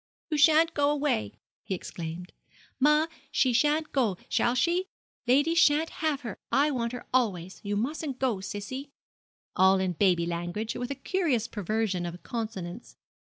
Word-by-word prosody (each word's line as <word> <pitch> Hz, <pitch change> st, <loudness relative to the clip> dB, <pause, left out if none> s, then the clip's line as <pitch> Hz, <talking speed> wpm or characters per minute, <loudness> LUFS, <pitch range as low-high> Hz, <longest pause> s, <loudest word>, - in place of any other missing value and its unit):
'You 305 Hz, -, +1 dB
shan't 320 Hz, +2 st, +5 dB
go 285 Hz, 0 st, +2 dB
away!' 275 Hz, -, 0 dB, 0.3 s
he 190 Hz, -, -3 dB
exclaimed. 170 Hz, 0 st, -7 dB, 0.5 s
'Ma, 300 Hz, +3 st, +5 dB, 0.3 s
she 255 Hz, -2 st, +2 dB
shan't 300 Hz, +5 st, +2 dB
go, 230 Hz, -9 st, +1 dB
shall 240 Hz, -, +2 dB
she? 345 Hz, +7 st, +2 dB, 0.4 s
lady 290 Hz, +6 st, +4 dB
shan't 320 Hz, -1 st, +4 dB
have 305 Hz, -3 st, 0 dB
her; 235 Hz, -7 st, -6 dB
I 290 Hz, +2 st, +3 dB
want 235 Hz, -3 st, -1 dB
her 250 Hz, -, -7 dB
always; 190 Hz, -8 st, 0 dB
you 205 Hz, 0 st, -1 dB
mustn't 275 Hz, +3 st, -2 dB
go, 255 Hz, -7 st, 0 dB
sissie,' 205 Hz, +9 st, -6 dB, 0.7 s
all 190 Hz, +1 st, +5 dB
in 185 Hz, -1 st, 0 dB
baby 175 Hz, -1 st, +2 dB
language, 175 Hz, +6 st, -3 dB
with 245 Hz, 0 st, -4 dB
a 280 Hz, -, -3 dB
curious 275 Hz, -, 0 dB
perversion 205 Hz, -4 st, -1 dB
of 175 Hz, +1 st, -8 dB
consonants. 185 Hz, -, -6 dB
235 Hz, 155 wpm, -28 LUFS, 190-290 Hz, 0.7 s, shan't